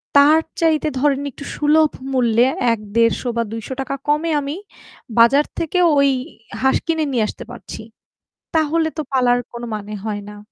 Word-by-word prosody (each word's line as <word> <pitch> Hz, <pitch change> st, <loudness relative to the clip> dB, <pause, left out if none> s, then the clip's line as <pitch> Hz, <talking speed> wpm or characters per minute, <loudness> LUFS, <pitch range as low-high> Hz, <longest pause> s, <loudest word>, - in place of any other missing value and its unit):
তার 295 Hz, +3 st, +7 dB, 0.2 s
চাইতে 315 Hz, -2 st, +2 dB
ধরেন 280 Hz, -1 st, +2 dB
একটু 280 Hz, -, -11 dB
সুলভ 305 Hz, +1 st, +3 dB, 0.2 s
মূল্যে 240 Hz, -1 st, +3 dB, 0.3 s
১-১৫০ 230 Hz, +2 st, 0 dB, 0.2 s
বা 230 Hz, -, +2 dB
৳২০০ 260 Hz, +4 st, -4 dB
কমে 300 Hz, +3 st, +1 dB
আমি 285 Hz, +2 st, -4 dB, 0.6 s
বাজার 275 Hz, +6 st, +5 dB
থেকে 335 Hz, +2 st, -1 dB, 0.2 s
ওই 280 Hz, 0 st, +5 dB, 0.5 s
হাঁস 265 Hz, 0 st, +3 dB
কিনে 320 Hz, -2 st, 0 dB
নিয়ে 235 Hz, -4 st, +1 dB
আসতে -, -, -7 dB
পারছি। 240 Hz, -, -9 dB, 0.7 s
তাহলে 320 Hz, +1 st, +2 dB
তো 310 Hz, -, -1 dB
পালার 245 Hz, -2 st, +3 dB
কোন 235 Hz, 0 st, -7 dB
মানে 210 Hz, 0 st, -6 dB
হয় 205 Hz, -2 st, -3 dB
না। 210 Hz, -, -11 dB
275 Hz, 150 wpm, -19 LUFS, 230-305 Hz, 0.7 s, তার